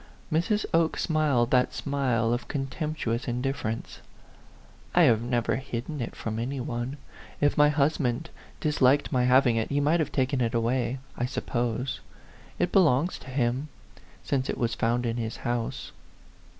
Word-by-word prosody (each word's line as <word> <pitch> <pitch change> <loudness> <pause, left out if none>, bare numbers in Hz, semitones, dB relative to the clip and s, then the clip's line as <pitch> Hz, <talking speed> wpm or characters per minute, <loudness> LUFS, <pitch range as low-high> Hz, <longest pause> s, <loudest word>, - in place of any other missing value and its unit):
Mrs. 210 +7 +1
Oke 165 -1 +2
smiled 145 -7 +1
that 125 -1 +3
smile 125 -5 0
of 120 - -3
contemptu 145 -2 -2
ous 120 +4 -3
indifference. 125 -2 -3 1.0
"I 175 - +7
have 115 -7 +5
never 120 -2 0
hidden 130 +3 -5
it 115 - -5
from 110 0 -4
any 130 +4 -3
one. 120 +2 -3 0.4
If 145 0 +2
my 150 0 +6
husband 145 -1 0 0.3
disliked 145 -2 +3
my 125 -3 +2
having 125 -2 +4
it, 110 - -1
he 140 - +1
might 150 +4 +3
have 155 - -1
taken 130 0 0
it 115 0 0
away, 120 +2 0 0.2
I 120 - -1
suppose. 120 0 -2 0.6
It - - 0
belongs 170 -3 +3
to 130 - -12
him, 130 +2 0 0.6
since 130 -2 -1
it - - -1
was 115 -2 0
found 120 +3 0
in 115 0 -1
his 115 -1 -3
house." 120 -1 -2
130 Hz, 155 wpm, -27 LUFS, 120-145 Hz, 1.0 s, I